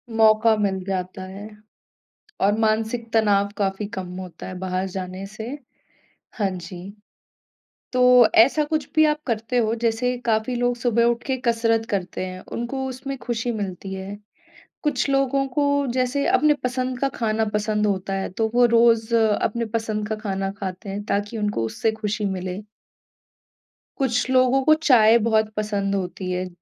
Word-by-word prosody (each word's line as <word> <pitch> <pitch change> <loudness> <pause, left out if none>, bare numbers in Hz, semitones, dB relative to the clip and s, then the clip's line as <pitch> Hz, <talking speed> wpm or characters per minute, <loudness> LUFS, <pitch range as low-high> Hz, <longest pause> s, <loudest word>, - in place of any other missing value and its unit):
मौका 220 0 +5
मिल 190 -3 -1
जाता 185 0 -3
है 200 +3 -9 0.9
और 205 +2 +3
मानसिक 225 +1 0
तनाव 205 -3 +3
काफ़ी 195 0 -1
कम 185 - -4
होता 180 -3 -8
है 185 - -6
बाहर 185 0 -2
जाने 185 +1 -6
से। 215 +2 -8 0.9
हाँ 205 -4 0
जी, 180 +2 -8 1.0
तो 250 -2 +6 0.2
ऐसा 300 +4 +1
कुछ 310 -2 -2
भी 310 0 +6
आप 300 0 +1
करते 230 +1 -1
हो? 225 -2 +2
जैसे 235 +2 0
काफ़ी 220 +2 +1
लोग 245 0 +1
सुबह 235 -1 +2
उठके 240 +3 0
कसरत 230 -1 +2
करते 185 -2 -2
हैं, 185 0 -7
उनको 265 +3 -3
उसमें 265 +1 -5
ख़ुशी 240 0 -2
मिलती 195 -3 -5
है। 190 +2 -6 0.7
कुछ 290 -3 0
लोगों 275 0 +2
को 285 -1 +2
जैसे 255 +2 0
अपने 295 +3 +4
पसंद 255 0 -2
का 275 - +2
खाना 220 -1 +1
पसंद 210 0 +1
होता 195 -1 -1
है। 195 0 -3
तो 220 -1 +1
वो 245 - +5
रोज़ 230 0 +4
अपने 225 +1 +1
पसंद 215 -2 -3
का 220 - -2
खाना 195 -2 -3
खाते 190 +1 -5
हैं 200 +1 -4
ताकि 205 +2 -2
उनको 205 - -1
उससे 165 - -1
ख़ुशी 210 0 -1
मिले। 190 0 -3 1.4
कुछ 250 -2 0
लोगों 255 +1 +4
को 310 - +6
चाय 230 -4 +7
बहुत 220 -1 +2
पसंद 200 -2 -1
होती 185 -1 -4
है 185 0 -2
220 Hz, 155 wpm, -23 LUFS, 195-245 Hz, 1.4 s, चाय